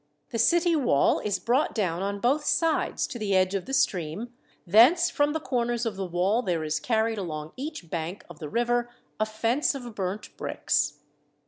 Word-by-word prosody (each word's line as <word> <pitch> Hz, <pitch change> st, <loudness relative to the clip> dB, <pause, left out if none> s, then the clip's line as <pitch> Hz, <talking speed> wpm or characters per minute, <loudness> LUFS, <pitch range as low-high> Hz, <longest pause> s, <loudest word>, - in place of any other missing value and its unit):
The 230 Hz, -, -2 dB
city 340 Hz, +7 st, +4 dB
wall 240 Hz, -, +3 dB
is 205 Hz, -2 st, -1 dB
brought 255 Hz, +9 st, +1 dB
down 180 Hz, -5 st, -1 dB
on 200 Hz, +1 st, -2 dB
both 270 Hz, +7 st, +2 dB
sides 325 Hz, +1 st, +1 dB
to 240 Hz, -, -7 dB
the 200 Hz, -3 st, 0 dB
edge 185 Hz, 0 st, +3 dB
of 195 Hz, -3 st, -2 dB
the 270 Hz, -, -5 dB
stream, 190 Hz, -, -1 dB, 0.3 s
thence 250 Hz, -, +6 dB
from 290 Hz, 0 st, +1 dB
the 320 Hz, -, -1 dB
corners 240 Hz, -4 st, -1 dB
of 225 Hz, -3 st, -2 dB
the 190 Hz, -1 st, -4 dB
wall 185 Hz, +7 st, +1 dB
there 175 Hz, -8 st, -1 dB
is 155 Hz, 0 st, -1 dB
carried 225 Hz, -2 st, 0 dB
along 155 Hz, -4 st, -5 dB
each 280 Hz, -, -6 dB
bank 170 Hz, +3 st, -4 dB
of 175 Hz, -3 st, -13 dB
the 150 Hz, -, -6 dB
river 240 Hz, +2 st, 0 dB, 0.3 s
a 215 Hz, -, +1 dB
fence 230 Hz, +7 st, 0 dB
of 245 Hz, -4 st, -7 dB
burned 195 Hz, +1 st, -4 dB
bricks. -, -, -1 dB
220 Hz, 190 wpm, -27 LUFS, 185-250 Hz, 0.3 s, thence